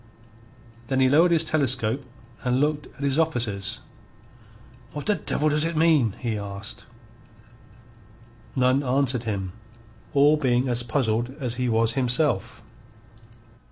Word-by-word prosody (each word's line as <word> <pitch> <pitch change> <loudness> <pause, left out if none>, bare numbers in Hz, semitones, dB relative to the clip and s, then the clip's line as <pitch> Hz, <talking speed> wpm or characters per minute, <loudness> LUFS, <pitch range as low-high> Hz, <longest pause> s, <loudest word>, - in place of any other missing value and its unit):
Then 135 +1 0
he 130 - +5
lowered 160 +7 +5
his 165 -1 +3
telescope 135 -5 +1 0.4
and 125 0 +1
looked 150 +1 0
at 140 - -7
his 140 +2 +1
officers. 120 - -1 1.1
"What 145 - -6
the 210 - +3
devil 155 -3 -1
does 150 0 +2
it 165 -1 -2
mean?" 155 - +3
he 115 -4 -3
asked. 100 +2 -8 1.7
None 130 +1 +3
answered 130 -2 0
him, 95 -4 -3 0.6
all 145 +2 +5
being 130 -3 +1
as 120 -1 +3
puzzled 120 0 -1
as 120 -3 -2
he 125 - +1
was 115 0 +2
himself. 125 - 0
130 Hz, 125 wpm, -24 LUFS, 115-150 Hz, 1.7 s, he